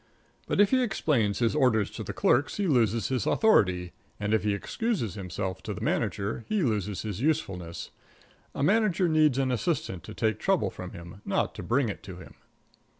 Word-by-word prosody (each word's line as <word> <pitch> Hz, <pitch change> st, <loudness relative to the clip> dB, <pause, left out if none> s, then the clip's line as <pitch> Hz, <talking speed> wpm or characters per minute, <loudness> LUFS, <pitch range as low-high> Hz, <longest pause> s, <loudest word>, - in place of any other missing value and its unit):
But -, -, -1 dB
if 205 Hz, -1 st, +5 dB
he 260 Hz, -1 st, +4 dB
explains 145 Hz, -, +1 dB
his 115 Hz, -2 st, +1 dB
orders 125 Hz, -8 st, +2 dB
to -, -, -6 dB
the -, -, -5 dB
clerks 130 Hz, +4 st, +2 dB
he 205 Hz, -, 0 dB
loses 115 Hz, -, +2 dB
his 130 Hz, -5 st, -1 dB
authority, 90 Hz, -, +3 dB, 0.3 s
and 105 Hz, +1 st, -1 dB
if 110 Hz, -, +2 dB
he 105 Hz, -1 st, +1 dB
excuses 190 Hz, -, -2 dB
himself 95 Hz, -1 st, -4 dB
to -, -, -5 dB
the -, -, -7 dB
manager 105 Hz, +3 st, -1 dB
he 215 Hz, -4 st, +1 dB
loses 105 Hz, -6 st, -1 dB
his 105 Hz, -1 st, -4 dB
usefulness. 95 Hz, -, -2 dB, 0.6 s
A -, -, -1 dB
manager 190 Hz, 0 st, +3 dB
needs 155 Hz, -4 st, +3 dB
an 135 Hz, -1 st, +1 dB
assistant 115 Hz, -, -1 dB
to -, -, -9 dB
take 110 Hz, -1 st, 0 dB
trouble 195 Hz, -2 st, +1 dB
from 90 Hz, 0 st, -8 dB
him, 85 Hz, +3 st, -10 dB
not -, -, 0 dB
to -, -, -7 dB
bring 125 Hz, +1 st, +1 dB
it 100 Hz, -, -5 dB
to 95 Hz, -3 st, -9 dB
him. 90 Hz, -, -12 dB
115 Hz, 190 wpm, -28 LUFS, 100-155 Hz, 0.6 s, if